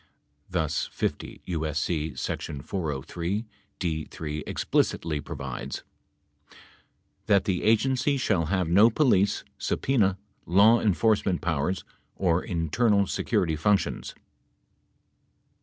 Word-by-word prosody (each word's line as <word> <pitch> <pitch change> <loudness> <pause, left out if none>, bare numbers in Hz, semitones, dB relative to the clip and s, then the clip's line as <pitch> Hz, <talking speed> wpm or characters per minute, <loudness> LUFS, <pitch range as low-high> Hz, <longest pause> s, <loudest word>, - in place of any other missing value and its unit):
Thus, 80 -4 -1
50 - - -3
U.S.C. 80 -1 -2
sec. - - -3
403(d) 85 - -4
(3) 75 -1 -5
explicitly 75 -3 0
provides: 70 -5 -6 1.4
That 100 -1 +4
the 95 -4 0
Agency 130 +5 +2
shall 90 -10 +1
have 90 +1 0
no 100 +7 +6
police, 105 -6 +2 0.2
subpena, 105 -8 +1 0.3
law 105 +6 +6
enforce 110 +1 +2
ment 90 -3 -1
powers, 80 +3 -1 0.3
or 90 -2 +2
internal 100 +5 +1
security 85 -3 0
functions 100 +6 0
90 Hz, 90 wpm, -27 LUFS, 80-105 Hz, 1.4 s, no